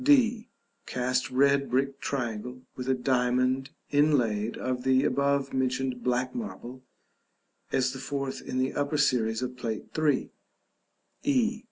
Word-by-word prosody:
d. 245 -5 +4 0.4
Cast 125 0 0
red 140 +1 +3
brick 135 +2 0
triangle, 125 -1 -3
with 125 0 -4
a - - +5
diamond 130 +1 +1 0.2
inlaid 120 -7 +2
of 125 -1 -2
the 130 +1 +3
above 140 0 +1
mentioned 130 -1 -1
black 125 +1 0
marble 130 - -6 0.9
(as 130 -1 +1
the 130 - -7
fourth 140 0 -3
in 130 - -4
the 130 +1 +1
upper 145 +1 0
series 120 -5 +2
of 125 0 -4
Plate 115 -4 -5
III.). 155 -2 +1 0.9
e. 240 -5 +1
130 Hz, 135 wpm, -28 LUFS, 125-140 Hz, 0.9 s, a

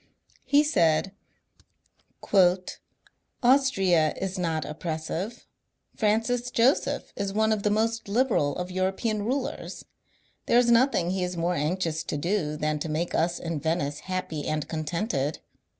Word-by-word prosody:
He 290 +1 +4
said: 175 - +2 1.1
'^ 185 -2 +3 0.7
Austria 195 - +3
is 190 0 -3
not 165 -3 -1
oppressive. 165 +7 -4 0.5
Francis 225 +3 +1
Joseph 245 +5 +1
is 200 -1 -3
one 220 +1 +2
of 215 -2 +1
the 210 - +1
most 225 +2 0
liberal 205 - +1
of 180 +1 -4
European 190 +4 -1
rulers. 260 +4 -3 0.6
There 235 - +4
is 240 -1 +4
nothing 235 -8 +3
he 190 -1 -1
is 180 0 -3
more 170 +2 0
anxious 160 0 -1
to 150 - -3
do 155 -2 -1
than 150 0 -1
to 160 - -4
make 160 +3 -2
us 170 +1 +1
in 165 -3 -4
Venice 150 -2 -1
happy 185 -5 -4
and 155 -1 -2
contented. 155 - -2
185 Hz, 135 wpm, -26 LUFS, 160-220 Hz, 1.1 s, He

